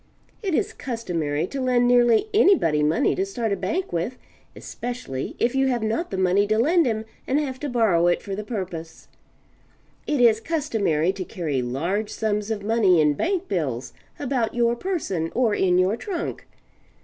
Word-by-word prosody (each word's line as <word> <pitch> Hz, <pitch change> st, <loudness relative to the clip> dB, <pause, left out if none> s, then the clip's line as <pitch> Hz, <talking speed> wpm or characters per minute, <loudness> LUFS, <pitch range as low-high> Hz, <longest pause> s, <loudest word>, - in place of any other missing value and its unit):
It 380 Hz, -7 st, -1 dB
is 430 Hz, +2 st, 0 dB
customary 170 Hz, -, -2 dB
to 270 Hz, +8 st, -5 dB
lend 250 Hz, -1 st, +2 dB
nearly 245 Hz, -, +4 dB
anybody 360 Hz, -, +4 dB
money 150 Hz, +2 st, +2 dB
to 190 Hz, -, 0 dB
start 220 Hz, +3 st, -3 dB
a -, -, +2 dB
bank 360 Hz, -, -3 dB
with 175 Hz, +10 st, -2 dB, 0.4 s
especially 235 Hz, -, -5 dB
if 240 Hz, -, +1 dB
you 270 Hz, 0 st, +2 dB
have 245 Hz, -3 st, 0 dB
not 225 Hz, +11 st, -1 dB
the 190 Hz, -, -4 dB
money 190 Hz, +2 st, +2 dB
to 215 Hz, +1 st, +1 dB
lend 320 Hz, +6 st, +3 dB
him 220 Hz, -1 st, -2 dB, 0.2 s
and 275 Hz, +3 st, +2 dB
have 265 Hz, -4 st, -3 dB
to 295 Hz, -, -3 dB
borrow 210 Hz, -9 st, +3 dB
it 175 Hz, -, +1 dB
for 200 Hz, -, -5 dB
the 210 Hz, -, -5 dB
purpose. 180 Hz, -7 st, -6 dB, 1.0 s
It 295 Hz, -3 st, 0 dB
is 230 Hz, -3 st, +5 dB
customary 220 Hz, -, 0 dB
to 195 Hz, -1 st, -5 dB
carry 155 Hz, -7 st, -3 dB
large 170 Hz, -, -2 dB
sums 210 Hz, -1 st, -2 dB
of 215 Hz, -3 st, -3 dB
money 205 Hz, -5 st, +3 dB
in 150 Hz, -1 st, +4 dB
bank 370 Hz, -, -1 dB
bills 130 Hz, -8 st, -2 dB, 0.2 s
about 250 Hz, -5 st, -1 dB
your 235 Hz, 0 st, +2 dB
person 235 Hz, -, -2 dB
or 235 Hz, -4 st, +2 dB
in 180 Hz, -3 st, +2 dB
your 185 Hz, +3 st, +3 dB
trunk. 360 Hz, -, -5 dB
220 Hz, 175 wpm, -24 LUFS, 180-255 Hz, 1.0 s, is